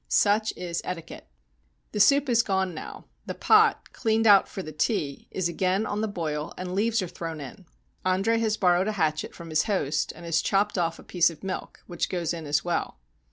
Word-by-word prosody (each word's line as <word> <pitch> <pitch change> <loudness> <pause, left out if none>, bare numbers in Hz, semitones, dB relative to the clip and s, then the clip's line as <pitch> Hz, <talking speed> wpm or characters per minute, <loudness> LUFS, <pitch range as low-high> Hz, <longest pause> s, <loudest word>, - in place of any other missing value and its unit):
Such 215 +1 +3
is 175 -1 -3
etiquette. 170 -3 -7 0.6
The 210 - -3
soup 280 +7 +5
is 235 -2 +4
gone 190 -4 -1
now; - - -8 0.2
the - - -4
pot, 440 +1 +3
cleaned 225 -1 +1
out 200 -3 +7
for 190 - -6
the 155 - -7
tea, 155 -2 -2
is 185 -2 -1
again 185 +4 0
on 210 0 -2
the 220 - 0
boil 160 -5 -4
and 180 0 -5
leaves 220 +2 +1
are - - -4
thrown 165 -2 -6
in. 160 +7 -10 0.4
Andre 195 +5 +2
has 220 -1 0
borrowed 180 +1 +3
a 215 - 0
hatchet 155 -5 -1
from 165 -1 -9
his 155 - +2
host, 150 -8 0
and 170 - -11
has 165 -1 +1
chopped 205 +1 +1
off 165 -1 0
a - - -13
piece 175 -2 +3
of 165 +1 -12
milk, 190 -1 -5
which 175 - -3
goes 175 -3 -1
in 165 -3 -6
as 150 +3 +1
well. 175 - -2
185 Hz, 205 wpm, -26 LUFS, 165-210 Hz, 0.6 s, out